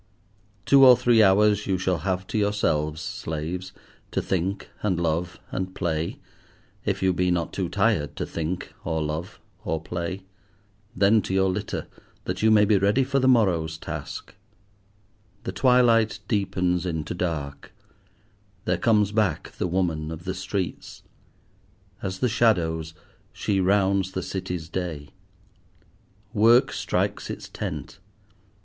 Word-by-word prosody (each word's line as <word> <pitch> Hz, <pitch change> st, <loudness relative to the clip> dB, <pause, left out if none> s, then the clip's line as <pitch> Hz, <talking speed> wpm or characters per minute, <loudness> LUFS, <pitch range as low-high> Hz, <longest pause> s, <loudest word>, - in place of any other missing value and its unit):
Two 140 Hz, -1 st, +6 dB
or 125 Hz, -2 st, +9 dB
three 120 Hz, -2 st, +4 dB
hours 105 Hz, +1 st, +4 dB
you 95 Hz, -1 st, +1 dB
shall 90 Hz, -1 st, 0 dB
have 95 Hz, +2 st, -2 dB
to -, -, -7 dB
yourselves, 80 Hz, -7 st, 0 dB
slaves, 90 Hz, -2 st, -4 dB, 0.4 s
to -, -, -1 dB
think 95 Hz, +2 st, -2 dB
and 95 Hz, -5 st, 0 dB
love 85 Hz, +1 st, -1 dB
and 95 Hz, 0 st, -4 dB
play, 80 Hz, -2 st, -2 dB, 0.7 s
if -, -, -1 dB
you 95 Hz, -1 st, +3 dB
be 90 Hz, +1 st, +1 dB
not 85 Hz, -2 st, -1 dB
too -, -, -2 dB
tired 75 Hz, -, +1 dB
to -, -, -3 dB
think, 85 Hz, +3 st, -4 dB
or 80 Hz, -1 st, -1 dB
love, 80 Hz, +5 st, -4 dB, 0.2 s
or 80 Hz, -7 st, -1 dB
play. 85 Hz, +3 st, -5 dB, 0.7 s
Then 105 Hz, +2 st, +4 dB
to 95 Hz, -, -3 dB
your 95 Hz, 0 st, +3 dB
litter, 90 Hz, -, -4 dB, 0.4 s
that -, -, -4 dB
you 110 Hz, -, +4 dB
may 105 Hz, -1 st, +6 dB
be 100 Hz, -1 st, +3 dB
ready 100 Hz, +7 st, +3 dB
for 135 Hz, +1 st, 0 dB
the 130 Hz, -, +2 dB
morrow's 90 Hz, -10 st, +3 dB
task. -, -, -7 dB, 1.1 s
The -, -, -3 dB
twilight 120 Hz, -5 st, +4 dB
deepens 90 Hz, -5 st, 0 dB
into 80 Hz, -4 st, -3 dB
dark; 80 Hz, -6 st, -4 dB, 0.9 s
there -, -, +1 dB
comes 105 Hz, -3 st, +3 dB
back 105 Hz, -6 st, 0 dB
the -, -, -3 dB
woman 85 Hz, -4 st, -1 dB
of 80 Hz, +1 st, -7 dB
the 95 Hz, +1 st, -3 dB
streets. 95 Hz, 0 st, -4 dB, 1.0 s
As 95 Hz, -2 st, -4 dB
the 125 Hz, -, +3 dB
shadows, 80 Hz, -9 st, +1 dB, 0.4 s
she 100 Hz, -2 st, -1 dB
rounds 95 Hz, 0 st, +2 dB
the 95 Hz, -, -3 dB
City's 90 Hz, -4 st, -4 dB
day. 85 Hz, -5 st, -4 dB, 1.2 s
Work 115 Hz, +4 st, +5 dB
strikes -, -, -1 dB
its -, -, -6 dB
tent. -, -, -6 dB
95 Hz, 140 wpm, -25 LUFS, 85-105 Hz, 1.2 s, or